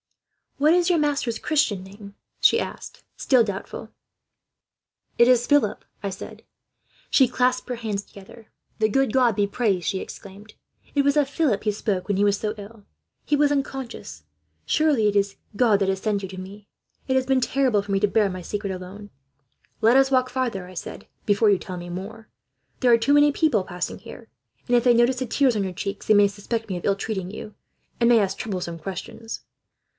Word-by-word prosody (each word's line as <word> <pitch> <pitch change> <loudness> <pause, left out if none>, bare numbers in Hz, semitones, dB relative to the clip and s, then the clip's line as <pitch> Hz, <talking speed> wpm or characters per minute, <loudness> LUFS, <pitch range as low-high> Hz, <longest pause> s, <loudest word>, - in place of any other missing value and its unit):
"'What 300 +3 +4
is 350 0 +3
your 345 -2 +3
master's 280 -6 0
Christian 235 -11 0
name?' 200 +1 -12 0.2
she - - +5
asked, - - -7
still 255 -5 +4
doubtful. 200 -3 -6 1.3
"'It 235 - +6
is 245 -1 +4
Philip,' 290 -8 +2 0.2
I 200 - -1
said. 190 - -9 0.7
"She 265 - +5
clasped 255 +1 0
her 250 - -2
hands 215 -4 -4
together. 205 +3 -15 0.3
"'The 215 0 +2
good 270 0 +1
God 245 -5 +3
be 205 - +2
praised!' 200 -5 -1
she 190 - 0
exclaimed. 200 +3 -11 0.4
'It 285 - +2
was 280 +1 +2
of 285 -2 +2
Philip 285 -9 0
he 210 - +1
spoke, 200 -3 -2
when 200 -2 0
he 200 - +2
was 205 -1 +3
so 215 -1 -2
ill. 210 +1 -11 0.4
He 295 - +2
was 290 0 +3
unconscious. 265 - -4 0.4
Surely 295 -9 +2
it 205 - 0
is 200 0 +2 0.2
He 205 - -15
that 220 -5 +3
has 190 0 -1
sent 210 -2 0
you 190 - -5
to 185 -1 -8
me. 200 +2 -10 0.4
It 260 - +1
has 260 0 +2
been 265 -1 +2
terrible 250 -5 +2
for 205 - -7
me 195 - +2
to 210 - +3
bear 205 0 +2
my 185 -1 -6
secret, 200 +2 -4
alone.' 190 +3 -8 0.7
"'Let 230 +4 +5
us 270 0 +4
walk 255 -1 +2
farther,' 245 -8 -2
I 185 - -12
said, - - -8 0.2
'before 205 +1 +3
you 195 - +2
tell 185 -1 -7
me 175 0 -8
more. 205 +5 -7 0.5
There 250 -2 +4
are 230 - +7
too 275 +5 +2
many 290 0 +6
people 280 - +1
passing 180 -1 -5
here; - - -12 0.4
and 245 - +3
if 240 - +3
they 245 -1 +5
notice 240 +2 +3
the 260 - -3
tears 260 0 +2
on 205 - 0
your 190 -1 -4
cheeks, 200 +3 -5
they 215 - +5
may 205 0 +6
suspect 215 +2 -4
me 185 - -2
of 175 - -7
ill 200 - +2
treating 195 -3 -4
you, 215 0 -9 0.4
and 235 0 +4
may 235 -1 +6
ask 195 -2 -1
troublesome 180 -5 -4
questions.' 210 +6 -7
215 Hz, 205 wpm, -24 LUFS, 195-255 Hz, 1.3 s, are